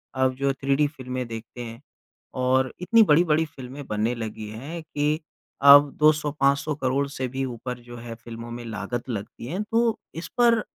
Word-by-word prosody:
अब 130 0 +2
जो 140 +1 +1
थ्री-डी 140 +2 +1
फ़िल्में 130 -3 -5
देखते 115 +1 -8
हैं 115 +2 -9 0.6
और 130 0 +2
इतनी 225 +5 +6
बड़ी-बड़ी 160 -1 +4
फ़िल्में 140 -2 -9
बनने 110 +3 0
लगी 110 -2 -6
हैं 140 +10 -6
कि 150 0 0 0.4
अब 140 +1 +9
200-500 150 -1 +2
करोड़ 140 0 0
से 130 -2 -3
भी 135 +2 -2
ऊपर 125 0 -5
जो 120 - -8
है 115 0 -7
फ़िल्मों 115 0 -9
में 120 0 -6
लागत 115 +3 -4
लगती 110 +1 -5
है। 180 +9 -2
तो 225 0 +1 0.2
इस 165 - -5
पर 235 -2 +5
135 Hz, 165 wpm, -25 LUFS, 120-150 Hz, 0.6 s, अब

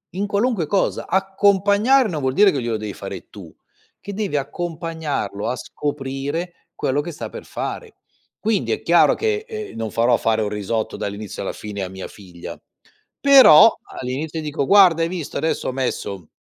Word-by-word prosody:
in 200 - -1
qualunque 205 -3 0
cosa. 195 +5 0
Accompagnare 200 +6 +3
non 155 -5 -3
vuol 130 -1 0
dire 205 +7 +6
che 140 - -2
glielo 120 -2 -2
devi 105 -1 -6
fare - - -8
tu, - - -12 0.4
che 200 - -8
devi 200 -6 -2
accompagnarlo 160 - -3
a 125 - -1
scoprire 145 +6 -5
quello 140 +2 -1
che 170 +3 -6
sta - - -7
per - - -9
fare. 455 -3 -6 0.4
Quindi 215 -2 0
è 435 - -1
chiaro - - +5
che, 435 -1 -1
ehm, 435 -2 -7
non 110 -2 -4
farò 120 +2 +3
fare 110 -1 +1
un 105 - -1
risotto 105 +2 -3
dall'inizio 100 0 -5
alla - - -3
fine 105 -2 -6
a 95 - -5
mia 95 0 -7
figlia. 90 -4 -11 0.6
Però, 260 - +8 0.3
all'inizio 145 +6 -4
dico: 150 -2 -2
"Guarda, 180 -2 +6
hai - - +1
visto? 175 -5 -5
Adesso 160 - -1
ho - - -1
messo, 100 - -4
155 Hz, 170 wpm, -21 LUFS, -, 0.6 s, Però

